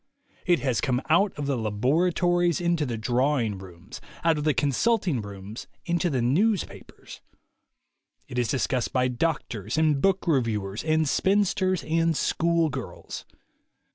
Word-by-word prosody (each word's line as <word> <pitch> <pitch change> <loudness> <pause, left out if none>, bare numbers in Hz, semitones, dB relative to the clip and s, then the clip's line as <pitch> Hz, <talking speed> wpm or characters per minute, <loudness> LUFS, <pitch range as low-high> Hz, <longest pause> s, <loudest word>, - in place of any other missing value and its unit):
It 175 -6 +3
has 125 -7 0
come 125 -1 +1
out 195 +5 +4
of 145 - -3
the 140 -1 0
laboratories 170 - +1
into 170 -4 0
the 115 -2 -3
draw 125 +6 +1
ing 110 -6 -2
rooms, 95 +4 -11 0.2
out 165 -1 +4
of 150 - -3
the 155 - +3
consulting 155 - +1
rooms 100 +2 -9 0.2
into 175 0 0
the 130 -5 0
newspapers. 190 - -1 1.1
It 125 - -3
is 120 - +1
discussed 130 0 -1
by 130 -1 +2
doctors 120 - -2
and 155 -3 +2
book 195 -1 +2
reviewers 110 - 0
and 155 0 +1
spinsters 190 +1 +1
and 165 0 +1
school 165 +2 +1
girls. 130 -3 -7
145 Hz, 140 wpm, -26 LUFS, 120-170 Hz, 1.1 s, out